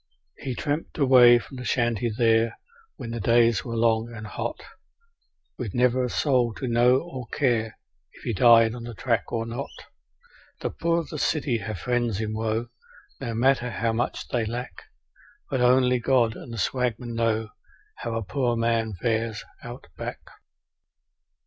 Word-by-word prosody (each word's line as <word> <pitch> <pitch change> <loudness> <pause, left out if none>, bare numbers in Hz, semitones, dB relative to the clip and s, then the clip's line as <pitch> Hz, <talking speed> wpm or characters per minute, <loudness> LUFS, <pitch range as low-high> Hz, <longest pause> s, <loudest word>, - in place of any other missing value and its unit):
He 130 -3 -4
tramped 150 +4 -3
away 125 -4 +7
from 130 +3 -8
the 125 - -6
shanty 120 -1 0
there, 115 0 +2 0.4
when 115 - -7
the 115 - -4
days 115 +1 +3
were 115 -2 -5
long 115 0 +1
and 110 -2 -8
hot, 205 - -4 1.0
With 115 -7 -4
never 125 +1 +3
a 125 - -1
soul 125 -4 +1
to 130 - -4
know 120 +1 +4
or 130 -8 -8
care 115 -6 0 0.4
if - - -17
he 115 - -2
died 115 +1 +6
on 120 - -7
the 120 -1 -7
track 115 -2 -1
or 115 -1 -1
not. 120 +4 -5 0.9
The - - -2
poor 170 0 0
of 165 - -11
the 155 - -5
city 135 -7 0
have 105 -1 -5
friends 120 +1 -1
in 110 -1 -2
woe, 110 +2 -2 0.5
no 120 -4 -4
matter 125 +1 +2
how 115 -1 -1
much 120 +3 -2
they 120 -2 0
lack, 120 +3 -6 0.7
But 130 -2 0
only 125 0 +4
God 120 -3 +2
and - - -10
the 115 - -6
swagmen 120 +3 -1
know 115 -1 0 0.5
how 115 -1 -4
a 115 - -2
poor 120 +5 0
man 115 -1 0
fares 110 +1 -1 0.2
Out - - -9
Back. - - -6
120 Hz, 165 wpm, -25 LUFS, 115-125 Hz, 1.0 s, away